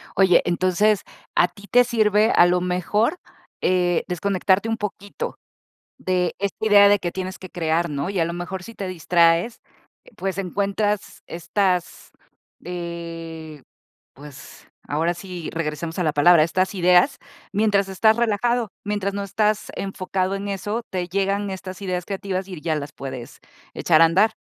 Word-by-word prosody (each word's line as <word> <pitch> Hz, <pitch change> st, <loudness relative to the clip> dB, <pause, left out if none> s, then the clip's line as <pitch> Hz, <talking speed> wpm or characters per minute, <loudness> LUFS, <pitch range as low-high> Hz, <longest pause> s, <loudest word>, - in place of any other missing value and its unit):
Oye, 190 Hz, -3 st, +5 dB
entonces, 185 Hz, +4 st, +2 dB, 0.3 s
a 175 Hz, -, +5 dB
ti 200 Hz, +2 st, -16 dB
te 245 Hz, 0 st, +6 dB
sirve, 215 Hz, -2 st, +2 dB
a 175 Hz, -, +7 dB
lo 180 Hz, 0 st, +2 dB
mejor, 205 Hz, -, 0 dB, 0.4 s
eh, 180 Hz, -2 st, +2 dB
desconectarte 190 Hz, +3 st, +1 dB
un 225 Hz, 0 st, -1 dB
poquito 205 Hz, -1 st, -5 dB, 0.6 s
de 180 Hz, -2 st, 0 dB
esta 200 Hz, +2 st, -3 dB
idea 205 Hz, -1 st, +7 dB
de 205 Hz, 0 st, +4 dB
que 175 Hz, -2 st, -4 dB
tienes 185 Hz, 0 st, -5 dB
que 185 Hz, -, -10 dB
crear, 170 Hz, 0 st, 0 dB
¿no? 145 Hz, +4 st, -3 dB
Y 200 Hz, -, -3 dB
a 165 Hz, -, +3 dB
lo 170 Hz, -, -3 dB
mejor, 175 Hz, +2 st, -5 dB
si 230 Hz, -, -10 dB
te 195 Hz, -, -5 dB
distraes, 170 Hz, +4 st, +2 dB, 0.6 s
pues, 195 Hz, -2 st, -3 dB
encuentras 200 Hz, +2 st, -2 dB
estas, 180 Hz, +1 st, -2 dB, 0.5 s
eh, 165 Hz, -3 st, -7 dB, 0.5 s
pues, 140 Hz, -1 st, -13 dB, 0.2 s
ahora 165 Hz, +4 st, 0 dB
sí, 180 Hz, -2 st, -7 dB
regresamos 165 Hz, +1 st, -4 dB
a 180 Hz, -, +1 dB
la 155 Hz, -, +1 dB
palabra, 155 Hz, +2 st, +6 dB
estas 185 Hz, +4 st, 0 dB
ideas, 180 Hz, -1 st, +4 dB, 0.3 s
mientras 205 Hz, -1 st, +2 dB
estás 220 Hz, +3 st, +3 dB
relajado, 235 Hz, 0 st, +1 dB
mientras 200 Hz, -1 st, -2 dB
no 200 Hz, 0 st, -3 dB
estás 210 Hz, +2 st, 0 dB
enfocado 190 Hz, 0 st, -2 dB
en 200 Hz, +1 st, -5 dB
eso, 205 Hz, +4 st, -3 dB
te 180 Hz, -1 st, -3 dB
llegan 200 Hz, +2 st, -1 dB
estas 190 Hz, 0 st, -7 dB
ideas 180 Hz, -2 st, -2 dB
creativas 195 Hz, -1 st, -3 dB
y 190 Hz, -, -11 dB
r 170 Hz, -, -7 dB
ya 160 Hz, -2 st, 0 dB
las 145 Hz, 0 st, -5 dB
puedes 130 Hz, -3 st, -8 dB, 0.4 s
echar 160 Hz, -2 st, +3 dB
a -, -, +9 dB
andar. 195 Hz, +7 st, +3 dB
185 Hz, 155 wpm, -22 LUFS, 170-200 Hz, 0.6 s, a